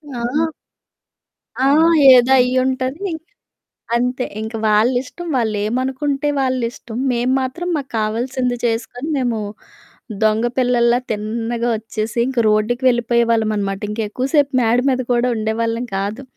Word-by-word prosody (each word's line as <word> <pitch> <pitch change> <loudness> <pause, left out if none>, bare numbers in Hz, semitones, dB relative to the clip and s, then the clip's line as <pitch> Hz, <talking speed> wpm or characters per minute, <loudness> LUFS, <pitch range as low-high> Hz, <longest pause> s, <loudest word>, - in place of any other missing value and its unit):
ఆ! 250 +7 0 1.2
ఆ! - - +4 0.5
ఏదో 250 +1 +5
అయ్యుంటదీ, 260 +7 0 0.9
అంతే. 250 +1 -1 0.2
ఇంక 220 +1 -6
వాళ్ళిష్టం. 245 +10 +1
వాళ్ళేమనుకుంటే 255 +6 -1
వాళ్ళిష్టం. 245 -3 -3 0.2
మేము 245 +2 0
మాత్రం 345 +8 -4
మాకు 275 -3 -5
కావాల్సింది 245 +3 -1
చేసుకొని, 240 +5 -2
మేము 240 -3 -1 0.8
దొంగ 220 +2 +2
పిల్లల్లా 245 -1 +3
తిన్నగా 230 +3 -2
ఒచ్చేసి, 220 0 -5
ఇంక 260 -2 -3
రోడ్డుకి 215 +4 +1
వెళ్ళిపోయేవాళ్ళమనమాట. 225 -4 +1
ఇంకెక్కువ 220 +4 -3
సేపు 285 -1 +3
మేడ 230 +2 +2
మీద 255 0 0
కూడా 240 +1 +2
ఉండేవాళ్ళం 230 +2 -2
కాదు. 205 +7 -3
240 Hz, 105 wpm, -19 LUFS, 225-255 Hz, 1.2 s, ఏదో